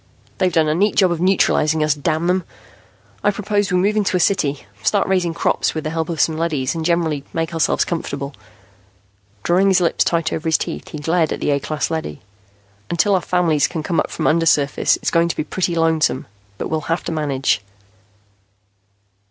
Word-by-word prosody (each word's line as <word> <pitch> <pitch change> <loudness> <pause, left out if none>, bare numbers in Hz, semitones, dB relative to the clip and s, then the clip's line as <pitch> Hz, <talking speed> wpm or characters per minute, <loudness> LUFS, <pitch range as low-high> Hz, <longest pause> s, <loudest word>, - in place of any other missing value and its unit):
"They've 185 -1 +2
done 160 -1 +2
a 150 - +2
neat 200 +6 +1
job 185 -3 +4
of 170 -1 -2
neutralizing 160 -4 +2
us, 150 -1 +2
damn 155 +3 -1
them. 180 +1 +1 0.8
I - - +4
propose 205 -1 -1
we 180 - +2
move 200 +4 +2
into 200 -3 +1
a - - -1
city, 145 - 0 0.2
start 200 - +1
raising 180 -3 0
crops - - 0
with 155 - -3
the 155 - -3
help 160 0 -2
of 165 -2 -3
some 160 -1 +2
leadys, 150 -6 -1
and 165 -1 -4
generally 160 -4 0
make 165 0 -2
ourselves 165 -1 +1
comfortable." 140 -4 -4 1.1
Drawing 185 +3 +3
his 190 -1 +4
lips 170 -2 +2
tight 165 -1 0
over 160 - -3
his 160 - +3
teeth, - - -5
he - - -7
glared 160 +2 0
at - - -3
the - - 0
A 140 - +1
class 155 +3 -3
leady. 155 - -4 0.7
"Until 175 +4 +2
our 185 - +2
families 170 -6 +2
can 160 -3 -5
come 170 +1 0
up - - -1
from - - -4
undersurface, 155 -3 +2
it's - - -2
going 170 0 +3
to 170 - -3
be - - 0
pretty 175 +2 -2
lonesome, 160 -4 +1 0.3
but - - -4
we'll 155 -1 -3
have 165 - 0
to - - -4
manage." 140 -7 0
165 Hz, 200 wpm, -19 LUFS, 155-180 Hz, 1.1 s, job